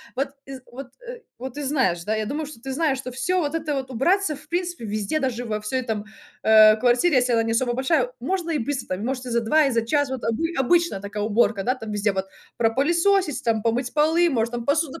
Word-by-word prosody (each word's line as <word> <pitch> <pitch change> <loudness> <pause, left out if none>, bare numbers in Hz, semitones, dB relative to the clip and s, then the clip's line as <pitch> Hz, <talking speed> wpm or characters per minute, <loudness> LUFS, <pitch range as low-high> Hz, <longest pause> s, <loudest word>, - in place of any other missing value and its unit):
Вот, 270 +1 -1 0.2
ты 270 0 -8
з 255 - -11
вот 260 +1 -8 0.2
ы - - -9
вот 260 +1 -7
ты 295 - -4
знаешь, 255 - +1
да, 215 - 0
я 215 0 -2
думаю, 295 +7 -3
что 285 -6 -11
ты 270 - -5
знаешь, 275 -1 0
что 255 -1 -6
всё 310 +9 0
вот 295 0 -2
это 310 -2 -2
вот 265 -1 -4
убраться, 325 - +1
в 300 - -18
принципе, 350 -6 -3
везде, 215 +7 -2
даже 245 -4 -2
во 215 -2 -3
всей 255 +5 -2
там, 220 -3 -3 0.4
э, 215 0 +7
квартире, 250 +8 +3
если 250 -1 +2
она 225 -1 +3
не 225 - -2
особо 240 +1 +1
большая, 260 0 +1
можно 340 +5 -2
и 315 - +1
быстро, 260 +2 -3
там. 195 - -6
Можете 255 0 -3
и - - -5
за 235 - +2
2 305 +7 +3
и 275 - +1
за 230 -1 +1
час. 285 +3 +1
Вот 260 -2 -4
обы 325 +9 -1
обычная 335 - +2
такая 205 +1 -4
уборка, 215 -1 +1
да. 255 +4 +1
Там 225 -5 -7
везде 205 0 0
вот 190 0 -2 0.3
пропылесосить, 325 - +2
там, 225 -2 +1
помыть 230 +2 +1
полы, 320 +3 +3
может, 235 -5 0
там, 235 -1 -4
посуду, 290 0 0
260 Hz, 245 wpm, -23 LUFS, 225-300 Hz, 0.4 s, э